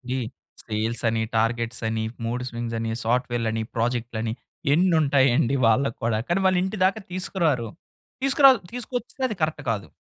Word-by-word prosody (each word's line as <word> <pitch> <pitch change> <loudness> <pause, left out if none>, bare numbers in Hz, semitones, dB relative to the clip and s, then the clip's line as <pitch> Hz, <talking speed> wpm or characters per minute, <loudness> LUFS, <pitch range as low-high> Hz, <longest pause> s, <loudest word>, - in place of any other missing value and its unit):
ఈ - - 0 0.5
సేల్స్ 110 +2 -2
అని, 110 0 0 0.2
టార్గెట్స్ 115 +1 0
అని, 110 0 -1 0.2
మూడ్ 125 +2 -2
స్వింగ్స్ 115 0 -4
అని, 115 0 -2
సాఫ్ట్‌వేర్లని, 115 -2 0
ప్రాజెక్టులని 115 -1 -1 0.4
ఎన్ని 180 +2 +3
ఉంటాయండి 135 -2 +3
వాళ్ళకి 120 +2 +2
కూడా? 115 -2 +1
కానీ 175 +2 +1
వాళ్ళు 185 -1 +4
ఇంటి 190 +2 -3
దాకా 200 +3 +1
తీసుకురారు. 165 - 0 0.6
తీసుకురాదు 275 -1 +6
తీసుకొచ్చినా 245 +1 -4
అది 215 - -3
కరెక్ట్ 155 -2 -1
కాదు. 100 -3 -3
120 Hz, 145 wpm, -24 LUFS, 115-180 Hz, 0.6 s, తీసుకురాదు